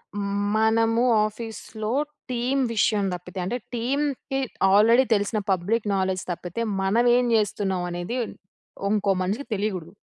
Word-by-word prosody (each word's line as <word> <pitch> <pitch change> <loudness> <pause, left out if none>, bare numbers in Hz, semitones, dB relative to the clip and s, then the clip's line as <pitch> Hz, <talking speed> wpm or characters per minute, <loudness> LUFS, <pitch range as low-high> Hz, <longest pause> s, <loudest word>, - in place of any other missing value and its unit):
హ్మ్, 200 0 -1
మనము 225 +1 +3 0.2
ఆఫీస్‌లో 220 0 -5 0.4
టీమ్ 250 +3 0
విషయం 210 -1 +2
దప్పితే, 180 +1 -7
అంటే, 235 +7 -2 0.2
టీమ్‌కి 270 +2 -1 0.3
ఆల్రెడీ 225 +5 +6
తెలిసిన 205 +1 0
పబ్లిక్ 205 +5 0
నాలెడ్జ్ 190 -1 0
తప్పితే, 175 +5 -5 0.2
మనమేం 240 +5 +3
జేస్తున్నాం 205 -4 0
అనేది, 175 +8 -3 0.7
ఉంకో 205 -1 +2
మనిషికి 205 +10 -2
తెలియగూడదు. 195 -5 -3
215 Hz, 115 wpm, -25 LUFS, 190-235 Hz, 0.7 s, ఆల్రెడీ